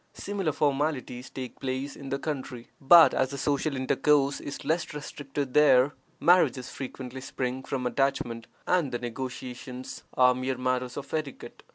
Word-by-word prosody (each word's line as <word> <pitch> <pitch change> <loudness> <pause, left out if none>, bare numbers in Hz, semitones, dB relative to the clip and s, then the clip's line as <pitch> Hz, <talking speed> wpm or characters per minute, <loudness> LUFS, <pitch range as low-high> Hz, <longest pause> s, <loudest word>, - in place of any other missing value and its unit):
Similar 195 -5 -2
formalities 140 -4 -1
take 130 -2 -7
place 135 +2 -3
in 140 -1 -8
the 140 - -1
country, 130 -5 -5
but, 165 +4 +8
as 130 - +1
the 140 - -5
social 140 +1 0
intercourse 140 +2 +2
is 140 - -7
less 160 +1 -1
restricted 145 -2 -5
there, 140 -2 +6 0.3
marriages 170 -7 +3
frequently 130 -1 -7
spring 130 -1 -3
from 130 -1 -3
attachment, 125 -3 -1 0.2
and 175 -7 +2
the 120 - -1
negotiations 125 +1 -6
are 125 0 +6
mere 130 +1 -2
matters 125 -1 -1
of 140 -1 -7
etiquette. 155 -4 -5
135 Hz, 150 wpm, -28 LUFS, 125-145 Hz, 0.3 s, but